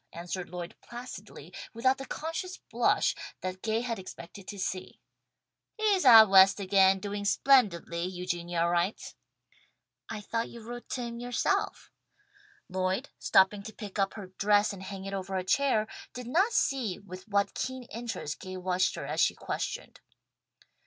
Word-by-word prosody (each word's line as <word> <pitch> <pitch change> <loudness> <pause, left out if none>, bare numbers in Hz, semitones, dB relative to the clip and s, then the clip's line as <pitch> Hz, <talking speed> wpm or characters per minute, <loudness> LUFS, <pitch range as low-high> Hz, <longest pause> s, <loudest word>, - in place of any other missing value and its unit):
answered 175 +2 -5
Lloyd 175 -1 -6
placidly, 240 +1 -10 0.2
without 260 +3 +2
the 270 - -7
conscious 330 +4 -4
blush - - +1 0.3
that 185 0 -4
Gay 225 +1 0
had 235 -3 -3
expected 185 +1 -10
to 205 - -6
see. 185 -1 -4 0.8
"He 435 - -6
is 370 -6 +1
out 225 -3 +10
West 195 +1 +7
again, 195 0 +4
doing 205 +1 -4
splendidly, 200 -8 +3
Eugenia 175 -2 -2
writes." 175 +4 0 1.0
"I 210 - -5
thought 230 +2 -2
you 235 - -10
wrote 240 +2 -8
to 250 - -3
him 235 0 -5
yourself." 245 0 -1 0.8
Lloyd, 185 +7 -1
stooping 195 +2 +4
to 220 +2 -9
pick 205 -1 -7
up 195 0 +1
her 195 -4 -8
dress 205 0 +3
and 195 - -9
hang 190 0 -7
it 195 - -5
over 195 0 -4
a 185 - 0
chair, 225 +1 +2 0.3
did 250 0 -6
not 360 - +2
see 250 - +1
with 185 0 -11
what 200 -1 +1
keen 260 0 -4
interest 230 -11 -5
Gay 185 0 -7
watched 185 0 +1
her - - -5
as - - -3
she - - +3
questioned. - - -5
200 Hz, 160 wpm, -29 LUFS, 185-235 Hz, 1.0 s, out